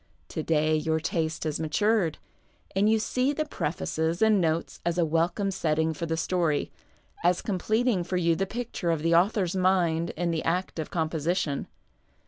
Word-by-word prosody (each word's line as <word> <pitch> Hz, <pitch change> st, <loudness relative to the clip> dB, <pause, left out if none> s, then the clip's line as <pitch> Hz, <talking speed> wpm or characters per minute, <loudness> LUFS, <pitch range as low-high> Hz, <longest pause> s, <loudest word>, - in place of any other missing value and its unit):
To -, -, -3 dB
day 155 Hz, 0 st, +2 dB
your 160 Hz, +1 st, 0 dB
taste 160 Hz, 0 st, -2 dB
has 155 Hz, -1 st, -2 dB
matured, 170 Hz, +2 st, +1 dB, 0.6 s
and 200 Hz, +2 st, +3 dB
you 220 Hz, -, +4 dB
see 255 Hz, +5 st, 0 dB
the 310 Hz, +1 st, -1 dB
prefaces 160 Hz, -, -2 dB
and 215 Hz, -3 st, +4 dB
notes 165 Hz, 0 st, -1 dB
as 170 Hz, 0 st, -1 dB
a 175 Hz, -, +3 dB
welcome 170 Hz, +5 st, 0 dB
setting 160 Hz, -3 st, 0 dB
for 165 Hz, +2 st, -4 dB
the 160 Hz, 0 st, -1 dB
story, 165 Hz, -4 st, 0 dB, 0.5 s
as 175 Hz, +1 st, +2 dB
completing 215 Hz, +1 st, +1 dB
for 180 Hz, +1 st, -2 dB
you 170 Hz, -2 st, +2 dB
the 195 Hz, +3 st, -1 dB
picture 230 Hz, -5 st, -3 dB
of 160 Hz, -2 st, 0 dB
the 165 Hz, 0 st, +2 dB
author's 185 Hz, +1 st, +2 dB
mind 175 Hz, -3 st, +2 dB
in 175 Hz, 0 st, 0 dB
the 160 Hz, -1 st, -1 dB
act 180 Hz, 0 st, -1 dB
of 155 Hz, -, -3 dB
com 160 Hz, -2 st, 0 dB
position. 160 Hz, -2 st, -1 dB
170 Hz, 175 wpm, -27 LUFS, 160-190 Hz, 0.6 s, you